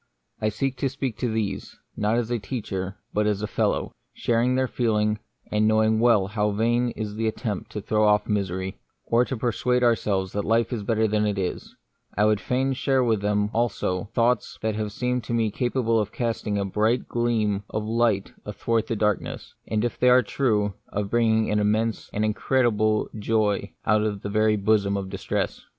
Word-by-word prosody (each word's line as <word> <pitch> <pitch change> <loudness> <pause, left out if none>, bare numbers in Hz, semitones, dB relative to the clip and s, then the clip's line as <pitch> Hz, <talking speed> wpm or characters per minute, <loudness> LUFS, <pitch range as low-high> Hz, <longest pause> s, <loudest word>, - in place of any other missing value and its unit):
I 110 - +2
seek 130 +5 -2
to 135 +2 0
speak 130 -3 -4
to 120 -3 0
these; 110 -2 -3 0.2
not 105 +2 +1
as 120 -1 -1
a 120 - 0
teacher, 100 -4 -4 0.2
but 105 0 +1
as 105 0 0
a - - -1
fellow. - - 0 0.2
Sharing 120 +2 +1
their 130 0 +1
feel 115 -3 0
ing, 105 0 +1 0.3
and 105 0 +2
knowing 110 0 +3
well 115 -4 +4
how 105 +1 0
vain 120 +4 +1
is 105 -2 -4
the 110 +1 -1
attempt 110 -2 -3
to 105 - -3
throw 110 +2 +1
off 105 0 +3
misery, 95 -2 -2 0.3
or 120 +1 +3
to 130 - -4
persuade 125 +2 0
ourselves 100 -5 +1
that 105 - -1
life 115 +3 +1
is 115 - -2
better 110 +1 +1
than 105 0 +1
it 105 -1 -1
is, 95 -2 -4 0.4
I 105 - +4
would 105 -1 +2
fain 130 +4 0
share 135 0 +1
with 110 -4 +1
them 105 0 +1
also 100 -5 0
some - - -15
thoughts 115 +1 0
that 110 0 +1
have 105 0 -3
seemed 125 +2 -1
to 120 - -2
me 110 -2 +1
capable 120 -1 +1
of 105 -1 -2
casting 115 -3 -2
a 100 - 0
bright 110 +5 +1
gleam 110 -4 0
of 110 0 -3
light 110 -3 +1
athwart 110 +2 -1
the 115 - -1
darkness, 105 -2 -2
and, 110 +1 0
if 120 - -3
they 125 - +5
are 125 0 +6
true, 105 -5 0
of 100 -1 -3
bringing 110 -2 +2
an 105 - +2
immense, 110 +2 0
an 105 - -1
incredible 110 -1 +1
joy 105 -3 0
out 105 +1 +3
of 105 -2 -2
the 100 - -3
very 110 +1 +3
bosom 100 -1 +2
of 95 -1 -5
distress. - - -2
110 Hz, 200 wpm, -25 LUFS, 105-120 Hz, 0.4 s, are